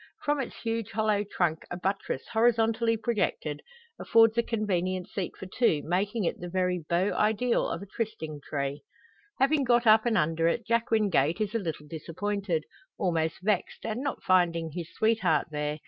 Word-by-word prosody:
From 295 -1 +1
its 265 - -4
huge 225 -2 -2
hollow 215 -1 +1
trunk 175 -5 -1
a 175 - -4
buttress, 190 -6 -2
horizontally 230 0 +2
projected, 205 -10 -1 0.4
affords 225 -1 +5
a 235 - +4
convenient 185 -5 -1
seat 190 -4 -5
for - - -8
two, 185 - +1
making 200 +6 0
it 170 - -1
the 175 - -6
very 180 0 0
beau 180 +4 +2
ideal 220 +3 +1
of - - -4
a - - -8
trysting 190 -9 -5
tree. 140 0 -3 0.6
Having 275 +1 +3
got 240 -1 +3
up 220 +1 +6
and 230 - +2
under 165 +2 +2
it, 225 +7 0
Jack 230 0 +1
Wingate 195 -7 +2
is 210 -1 -1
a 230 - +1
little 160 -6 -5
disappointed 170 +3 -3 0.3
almost 165 -3 -1
vexed 205 -2 -1
at 220 - -2
not 275 +1 -3
finding 170 -3 +2
his 170 +1 -6
sweetheart 205 -9 +1
there. 150 0 -2
200 Hz, 170 wpm, -28 LUFS, 170-225 Hz, 0.6 s, up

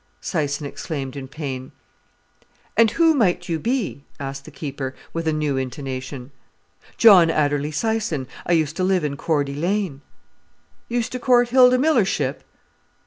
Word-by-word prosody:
Syson 145 -3 -2
exclaimed 140 -2 -5
in 135 -1 -6
pain. 135 -3 -6 1.0
"And 230 0 +5
who 330 +6 +4
might 190 - +1
you 165 -2 -1
be?" 230 - -2 0.2
asked 135 0 -6
the - - -9
keeper, 140 -3 -5 0.2
with 165 -1 -3
a - - +3
new 150 -3 -1
intonation. 130 0 -5 0.7
"John 190 -7 +7
Adderley 145 -2 +1
Syson; 175 -3 -1 0.2
I 175 - +3
used 160 -2 +1
to 185 - 0
live 185 -2 +2
in 145 -2 -2
Cordy 145 -2 -1
Lane." 175 -1 -1 0.9
"Used 240 0 -1
to 255 - -4
court 245 -1 +3
Hilda 250 0 +6
Millership?" 205 - +1
155 Hz, 140 wpm, -22 LUFS, 140-215 Hz, 1.0 s, John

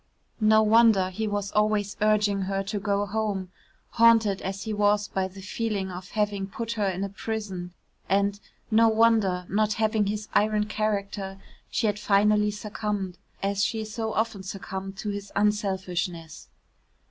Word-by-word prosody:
No 215 0 +5
wonder 215 -4 +5
he 220 +4 -2
was 205 -1 -2
always 210 -1 +1
urging 210 -2 +3
her 195 0 -1
to 205 +1 -3
go 200 0 0
home 200 -3 -2 0.4
haunted 225 -4 +4
as 190 0 -4
he 220 - -3
was 205 0 +2
by 190 -1 -1
the 190 +1 -12
feeling 200 -2 -2
of 180 +1 -8
having 205 -2 0
put 230 +4 -5
her 215 -3 0
in 190 +1 -3
a 200 - -2
prison 195 -4 -5 0.3
and, 200 +1 +2 0.3
no 225 +1 +6
wonder, 220 -5 +3
not 215 +1 +1
having 215 -1 +1
his 210 +1 -3
iron 210 0 +2
character, 200 -2 -2 0.3
she - - 0
had 210 -1 0
finally 210 0 +3
succumbed 205 -3 -4 0.2
as 200 0 +1
she 220 0 -1
so 220 +1 -3
often 220 -2 -1
succumbed 190 0 -6
to 210 - -4
his 200 0 -6
unselfishness. 185 -5 -1
205 Hz, 155 wpm, -26 LUFS, 195-215 Hz, 0.4 s, no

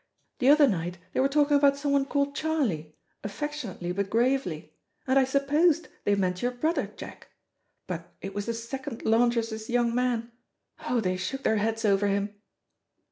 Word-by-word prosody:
The 255 - +4
other 295 0 +7
night 175 -4 -2 0.2
they - - 0
were 265 - +4
talking 290 0 +3
about 280 -1 +4
someone 280 -1 +1
called 280 0 0
'Charlie,' 230 - -1 0.3
affectionately 205 - -4
but 195 +2 -2
gravely, 225 - 0 0.3
and 265 +1 +4
I 265 - +4
supposed 295 +5 +2 0.2
they 205 - +3
meant 180 -2 -1
your 245 - +1
brother, 310 +7 -1
Jack, - - -10 0.6
but - - -6
it 195 - -7
was 205 +1 -4
the 230 - 0
second 235 +2 -6
laundress's 225 -1 +1
young 240 -1 +2
man. 240 -1 0 0.6
Oh, 245 -2 +2
they 185 -2 -1
shook 270 +9 -4
their 220 - +2
heads 225 +1 -1
over 200 0 +3
him." 200 +1 -1
235 Hz, 165 wpm, -27 LUFS, 200-280 Hz, 0.6 s, other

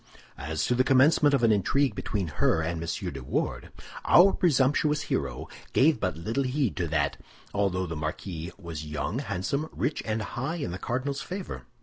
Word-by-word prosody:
As 75 +2 -2
to - - +1
the 125 +1 +3
commencement 140 +2 +5
of 120 - 0
an 115 - +5
intrigue 135 +8 +2
between 100 -5 -2
her 80 +1 +1
and 80 0 -2
M. 85 -3 -3
de 70 -2 -7
Wardes, - - -2 0.3
our 190 +3 +7
presumptuous 150 -1 +2
hero - - -2 0.3
gave 150 +4 +4
but 90 -4 -1
little 110 +11 -1
heed 130 -2 0
to 85 -3 0
that, 75 -2 0 0.4
although 95 -2 0
the 80 -2 -5
marquis 80 +3 -4
was 85 -5 -7
young, 75 - -3
handsome, 140 - -2
rich, 150 - -2
and 110 0 -2
high 130 +10 -3
in 145 - -3
the 90 - -5
cardinal's 130 +7 -2
favor. 180 - -6
110 Hz, 180 wpm, -27 LUFS, 85-140 Hz, 0.4 s, our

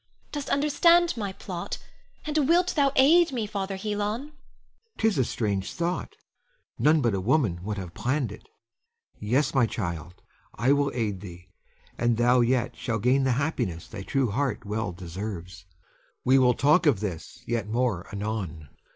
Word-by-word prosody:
Dost 290 -2 -4
understand 335 +4 +4
my 205 -4 -3
plot, 185 -2 -6 0.5
and 300 -2 +1
wilt 355 +2 +3
thou 280 -3 +3
aid 325 +5 +6
me, 235 -5 -2
Father 195 -2 -3
Helon? 205 +1 -3 0.3
Helon. - - -25 0.6
'Tis 220 -5 +2
a - - +4
strange 100 -5 -2
thought! 170 +1 -2 0.6
None 155 +1 +4
but 120 -4 +1
a 95 - -1
woman 110 - +1
would 105 +2 -4
have 90 -3 -6
planned 125 +1 -1
it. 105 - -12 0.7
Yes, 130 +7 +1
my 125 -4 +3
child, 85 -4 -5 0.3
I 120 +6 +2
will 140 0 +2
aid 105 -6 -2
thee, 90 -2 -11 0.5
and 120 -1 +2
thou 120 +1 +4
yet 120 0 +1
shall 115 -3 -2
gain 130 +5 +2
the 130 - +3
happiness 120 - -2
thy 100 - -8
true 130 +2 0
heart 135 +2 -1
well 105 -1 -2
deserves. 90 0 -7 0.6
We 130 +1 +5
will 125 -2 +4
talk 150 +5 +4
of 135 -9 +4
this 95 -6 -6
yet 115 -3 -2
more 115 -5 -1
anon. 100 -8 -4
120 Hz, 160 wpm, -26 LUFS, -, 0.7 s, aid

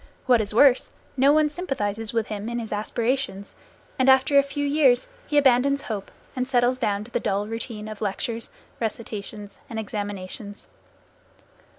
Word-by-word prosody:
What 245 -3 +5
is 205 - +1
worse, 255 +3 +5 0.2
no 275 +1 +5
one 305 0 +4
sympathizes 225 - -2
with 225 -2 0
him 210 +1 -5
in 235 - -3
his 225 -2 -4
aspirations, 225 0 -2 0.4
and 260 +1 +4
after 265 +2 +5
a 280 - +9
few 280 +1 -3
years 280 -4 +3 0.2
he 295 - 0
abandons 275 0 +4
hope 205 -4 -5 0.3
and 255 -1 -1
settles 250 -1 +2
down 205 -4 0
to 235 - -14
the - - 0
dull 200 +1 -1
routine 225 -1 -6
of 215 -1 -8
lectures, 225 +3 -3 0.3
recitations 215 -2 -5
and 225 - -5
examinations. 205 -1 -6
230 Hz, 160 wpm, -25 LUFS, 210-265 Hz, 0.4 s, a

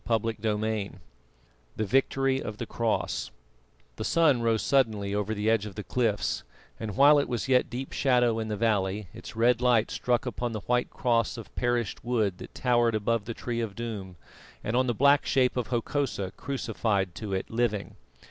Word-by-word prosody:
CHAPTER 115 -1 +1
XXII 110 -1 -1 0.8
THE 110 - -1
VICTORY 135 +4 +1
OF 105 - -6
THE 120 - -4
CROSS 115 0 -1 0.7
The - - -3
sun 150 -7 +3
rose 115 -3 +1
suddenly 110 -6 +1
over 105 +1 -1
the 105 +1 -2
edge 110 -2 +2
of 100 - -10
the 105 - -5
cliffs, 115 -4 0 0.4
and 105 -3 -5
while 145 +1 +7
it 140 - -1
was 120 +1 -2
yet 130 -1 +3
deep 130 +2 -5
shadow 125 -4 +2
in 110 - -3
the 105 -1 -3
valley, 100 -3 0
its - - -10
red 120 +1 +3
light 120 -3 +3
struck 120 0 0
upon 120 -1 -3
the 110 - -4
white 125 +2 0
cross 115 -2 0
of 115 - -10
perished 120 -3 -1
wood 110 -6 0
that - - -10
towered 120 -2 +2
above 110 0 0
the 115 +1 -5
Tree 120 -1 -3
of 110 -4 -4
Doom 105 -6 -5 0.5
and 110 - -2
on 130 +1 +3
the 120 - 0
black 140 +4 +5
shape 130 -2 +2
of 125 -2 -1
Hokosa 120 -5 -1
crucified 110 -8 -1
to 105 0 -5
it 95 - -3
living. 115 -3 -1
115 Hz, 185 wpm, -28 LUFS, 105-125 Hz, 0.8 s, while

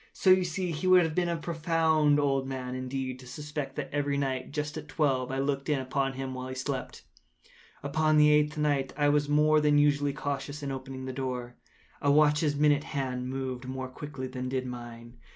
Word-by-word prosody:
So 185 - +3
you 185 0 +6
see 180 +1 -2
he 165 +4 -3
would 185 -1 +7
have 160 -1 -1
been 175 +1 +1
a 170 - 0
very 160 - -8
profound 160 -3 +2
old 135 -2 +1
man, 130 -1 -4
indeed, 130 0 -4
to 130 - -12
suspect 145 +1 -5
that 140 -2 -5
every 145 -1 0
night, 130 -2 -2
just 150 0 -3
at 155 -1 -7
twelve, 135 -5 0
I 135 - -2
looked 140 +1 -1
in 150 - +2
upon 135 +1 -1
him 135 0 -5
while 130 0 -5
he 130 - -6
slept. 130 0 -4 0.8
Upon 155 +2 +2
the 150 0 +6
eighth 150 0 +3
night 145 -3 0
I 145 -1 +3
was 145 0 +2
more 150 +1 +4
than 150 -1 +4
usually 145 -1 +3
cautious 140 +1 -4
in 140 - -3
opening 130 0 -6
the 130 - -4
door. 125 -2 -4 0.5
A 145 - +2
watch’s 150 0 +3
minute 150 0 +3
hand 130 -3 -3
moves 130 -1 -4
more 130 0 -4
quickly 140 0 -7
than 130 0 -5
did 130 0 -2
mine. 120 -4 -9
140 Hz, 205 wpm, -29 LUFS, 130-150 Hz, 0.8 s, would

